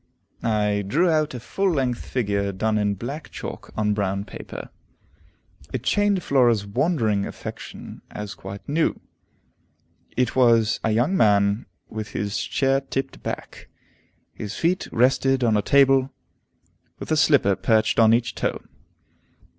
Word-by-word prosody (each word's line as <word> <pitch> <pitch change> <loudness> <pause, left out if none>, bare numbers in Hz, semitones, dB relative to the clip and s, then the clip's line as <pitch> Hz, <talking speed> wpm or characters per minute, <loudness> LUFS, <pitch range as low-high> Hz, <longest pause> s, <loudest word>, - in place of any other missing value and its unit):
I 105 -2 +1
drew 170 - +2
out 155 -4 +1
a - - -5
full 195 - -1
length 130 -5 -1
figure 100 -5 -1
done 110 +3 0
in 105 -1 +1
black 140 - -6
chalk - - -8
on 105 -1 +1
brown 100 -1 -1
paper. - - -9 1.0
It 125 - -3
chained 205 +2 +2
Flora's 120 -6 +3
wondering 110 - 0
attention - - -9
as 105 -1 -6
quite 100 0 -9
new. 155 +3 0 1.2
It 125 -2 +1
was 115 -4 +4
a - - +1
young 120 - +2
man 100 - +3 0.2
with 110 -1 -7
his 100 0 -2
chair 135 0 +1
tipped 135 0 -4
back; - - -7 0.6
his 105 -1 -6
feet 175 +3 0
rested 130 +2 +2
on 115 -2 +3
a 105 - +3
table, 135 0 +4 0.9
with - - -7
a - - +4
slipper 140 -10 +4
perched 110 +1 +2
on 110 -1 +6
each 120 0 +2
toe. - - -2
115 Hz, 140 wpm, -23 LUFS, 105-135 Hz, 1.2 s, on